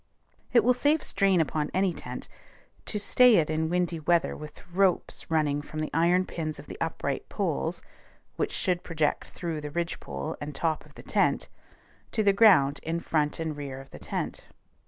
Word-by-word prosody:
It 235 Hz, -3 st, +5 dB
will 250 Hz, +3 st, +5 dB
save 290 Hz, +4 st, +2 dB
strain 195 Hz, -3 st, +3 dB
upon 150 Hz, -1 st, 0 dB
any 190 Hz, -1 st, +2 dB
tent, -, -, -6 dB, 0.6 s
to 210 Hz, -, 0 dB
stay 245 Hz, +3 st, +6 dB
it 160 Hz, -4 st, +3 dB
in 160 Hz, 0 st, 0 dB
windy 175 Hz, -1 st, 0 dB
weather 170 Hz, +2 st, +2 dB
with 150 Hz, 0 st, -11 dB
ropes 190 Hz, -1 st, +1 dB
running 150 Hz, -3 st, +1 dB
from 155 Hz, +1 st, -7 dB
the 155 Hz, -, -2 dB
iron 175 Hz, +3 st, +3 dB
pins 155 Hz, -4 st, -4 dB
of -, -, -10 dB
the -, -, -10 dB
upright -, -, -2 dB
poles -, -, -2 dB, 0.5 s
(which -, -, -1 dB
should 180 Hz, -1 st, 0 dB
project 160 Hz, -4 st, -1 dB
through 165 Hz, -3 st, -4 dB
the 150 Hz, -, -5 dB
ridgepole 145 Hz, -, -4 dB
and 145 Hz, -1 st, -5 dB
top 160 Hz, +1 st, -1 dB
of -, -, -22 dB
the -, -, -11 dB
tent) -, -, +1 dB, 0.6 s
to 220 Hz, -, +2 dB
the 200 Hz, -1 st, +5 dB
ground 185 Hz, -10 st, +5 dB
in 165 Hz, +1 st, -2 dB
front 150 Hz, -3 st, 0 dB
and 160 Hz, -2 st, -2 dB
rear 140 Hz, -2 st, -6 dB
of 135 Hz, 0 st, -13 dB
the -, -, -10 dB
tent. -, -, -4 dB
165 Hz, 180 wpm, -28 LUFS, 150-185 Hz, 0.6 s, stay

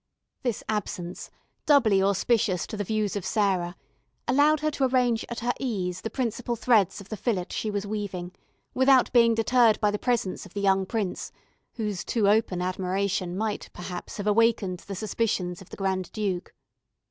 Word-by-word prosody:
This 240 Hz, -6 st, -2 dB
absence, 180 Hz, -4 st, -4 dB, 0.4 s
doubly 225 Hz, -10 st, +5 dB
auspicious 200 Hz, -1 st, +2 dB
to -, -, -7 dB
the 205 Hz, -, -2 dB
views 215 Hz, 0 st, -1 dB
of 200 Hz, -, -3 dB
Sarah, 185 Hz, -5 st, 0 dB, 0.5 s
allowed 290 Hz, +4 st, +4 dB
her 305 Hz, 0 st, +1 dB
to 280 Hz, -2 st, +1 dB
arrange 250 Hz, -3 st, +2 dB
at 235 Hz, 0 st, -5 dB
her 245 Hz, +1 st, +1 dB
ease 185 Hz, -8 st, -2 dB
the 225 Hz, -, -3 dB
principal 240 Hz, 0 st, -2 dB
threads 215 Hz, -4 st, +2 dB
of 200 Hz, -, -14 dB
the 215 Hz, -, -3 dB
fillet 200 Hz, -4 st, -1 dB
she 215 Hz, -, -2 dB
was 205 Hz, -1 st, -2 dB
weaving, 200 Hz, -4 st, -4 dB, 0.4 s
without 260 Hz, -1 st, +4 dB
being 230 Hz, -2 st, +5 dB
deterred 225 Hz, 0 st, +4 dB
by 210 Hz, -2 st, +2 dB
the 210 Hz, -, -3 dB
presence 235 Hz, -7 st, -1 dB
of 195 Hz, -, -14 dB
the -, -, -1 dB
young 195 Hz, -1 st, +2 dB
prince, 210 Hz, -4 st, -3 dB, 0.4 s
whose 210 Hz, -5 st, -3 dB
too 220 Hz, -4 st, +1 dB
open 200 Hz, -4 st, +2 dB
admiration 185 Hz, 0 st, -1 dB
might, 215 Hz, 0 st, -2 dB
perhaps, 180 Hz, 0 st, -7 dB
have 205 Hz, -, -4 dB
awakened 210 Hz, -4 st, +2 dB
the 195 Hz, -, -7 dB
suspicions 195 Hz, -4 st, -1 dB
of 190 Hz, -, -14 dB
the -, -, -9 dB
Grand 190 Hz, -2 st, -1 dB
Duke. 195 Hz, -5 st, -2 dB
210 Hz, 170 wpm, -26 LUFS, 190-230 Hz, 0.5 s, doubly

